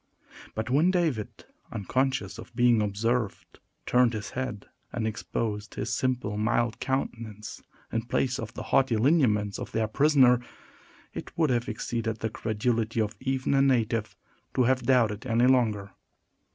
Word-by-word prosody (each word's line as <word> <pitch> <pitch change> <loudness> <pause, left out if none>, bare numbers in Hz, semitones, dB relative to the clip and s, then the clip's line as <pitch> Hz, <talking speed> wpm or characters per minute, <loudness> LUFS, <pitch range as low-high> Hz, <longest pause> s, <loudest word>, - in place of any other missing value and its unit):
But 110 +3 -3
when 155 +7 +4
David, 160 - -1 0.3
unconscious 130 +5 -1
of 120 - -11
being 120 -2 +4
observed, 110 +2 -2 0.3
turned 125 -1 +3
his 110 -1 -5
head, 125 -6 -4 0.3
and 115 - -2
exposed 110 -1 -3
his - - -2
simple, 125 -5 -1
mild 115 +1 +1
countenance, 115 -4 -4 0.3
in 115 - 0
place 130 0 0
of 115 -1 -5
the - - -5
haughty 135 -4 +4
lineaments 110 -6 +2
of - - -7
their 110 -1 +1
prisoner, 130 0 +5 0.7
it - - -8
would 160 -5 +3
have 120 0 0
exceeded 110 0 -3
the 110 0 -3
credulity 115 +1 -1
of 110 0 0
even 130 0 -1
a 135 - +4
native 115 -5 +1 0.4
to 130 - +4
have 130 +1 +2
doubted 120 -2 +2
any 120 +1 +3
longer. 110 -6 +2
120 Hz, 145 wpm, -27 LUFS, 110-130 Hz, 0.7 s, prisoner